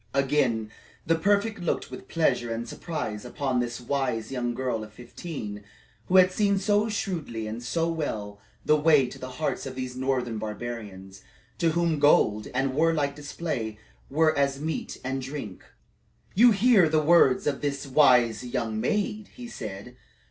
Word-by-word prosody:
Again 135 -6 +1 0.3
the 165 - +3
prefect 205 +5 +1
looked 175 - -2
with - - -9
pleasure 125 -8 +1
and 115 +1 -3
surprise 130 -11 -5
upon 130 0 -1
this 120 0 -2
wise 125 -3 -2
young 120 -2 -2
girl 125 -3 -2
of 105 - -11
fifteen, 120 -2 -7 0.4
who 185 - +1
had 185 0 +7
seen 200 0 +2
so 205 +3 +2
shrewdly 165 - -3
and 110 +2 -5
so 165 +7 -1
well 110 -11 -3 0.3
the 150 - +5
way 150 -3 +5
to - - -9
the 130 0 -7
hearts 155 -3 -2
of 130 - -7
these 130 -1 -5
northern 125 -3 -1
barbarians, 105 -4 -7 0.4
to 165 -2 +2
whom 170 -2 +1
gold 110 -7 +4
and 135 +1 0
warlike 150 -2 +1
display 145 -7 -4 0.3
were 155 +2 +3
as 140 -1 +1
meat 155 0 -4
and 135 +1 -2
drink. 130 -8 -7 0.7
"You 240 +5 +7
hear 205 -5 +5
the 155 0 +3
words 150 -5 +5
of 140 -2 -1
this 140 -1 -2
wise 125 -5 +4
young 115 -3 -2
maid," 210 - -1
he 245 -1 -8
said. 120 - -8
135 Hz, 160 wpm, -26 LUFS, 120-165 Hz, 0.7 s, had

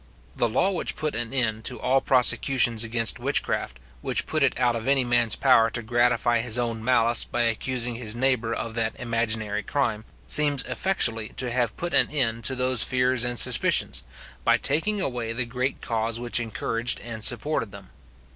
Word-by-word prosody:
The 120 - 0
law 135 - +1
which 180 - -2
put 155 -1 -3
an 115 0 -3
end 110 -5 -1
to 125 - -1
all 130 +1 +1
prosecutions 120 -2 +3
against 115 -1 0
witchcraft, - - -2 0.2
which - - 0
put 155 - -3
it 130 -3 +1
out 120 -2 +1
of 115 +2 -6
any 135 -1 +3
man's 120 -2 +1
power 115 -4 +3
to 120 0 -3
gratify 120 0 +1
his 120 0 0
own 115 -2 -3
malice 120 -1 +3
by 120 - -2
accusing 120 +1 -1
his 115 -2 -4
neighbour 120 -2 0
of 115 0 -4
that 115 -1 -2
imaginary 110 -3 -2
crime, 115 -5 -2 0.2
seems 145 -3 +3
effectually 115 - 0
to 125 -2 -3
have 120 -2 -1
put 175 0 -4
an - - +4
end 115 -6 -1
to 130 - +2
those 125 -2 +3
fears 125 -1 +1
and 120 0 -2
suspicions, - - +3 0.4
by - - +3
taking 200 +9 0
away 120 -9 -3
the 120 +1 0
great 125 +3 -4
cause 115 0 -2
which 120 0 0
encouraged 115 +1 -1
and 115 -2 -7
supported 130 -8 0
them. 100 -1 -13
120 Hz, 180 wpm, -24 LUFS, 115-130 Hz, 0.4 s, an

